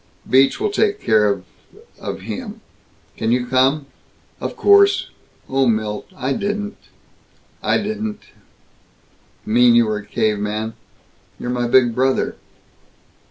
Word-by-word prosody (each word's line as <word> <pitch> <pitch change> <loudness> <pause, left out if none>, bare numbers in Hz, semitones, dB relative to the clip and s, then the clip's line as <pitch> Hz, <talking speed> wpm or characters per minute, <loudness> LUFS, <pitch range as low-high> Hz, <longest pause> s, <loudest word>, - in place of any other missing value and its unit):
Beach 135 +1 +4
will 420 0 0
take 415 0 +1
care 105 -1 +3
of 100 -2 -2 0.5
of - - -6
him. 225 -4 -7 0.6
Can 110 0 -1
you 125 0 +1
come?" 130 +4 +2 0.5
"Of - - -4
course. 400 -1 +4 0.4
Oh, 135 0 +1
Milt, 110 -2 -1
I 130 +2 -1
didn't 205 +4 -3 0.5
" - - -36
"I - - +4
didn't 215 0 -4 0.5
" - - -36
" - - -36
mean 120 +2 +5
you 120 -1 +5
were 110 -1 -1
a 105 - -12
caveman! 110 +1 -1 0.7
You're 125 - -3
my 120 -1 -1
big 120 -1 +4
brother!" 130 +2 0
130 Hz, 135 wpm, -20 LUFS, -, 0.7 s, mean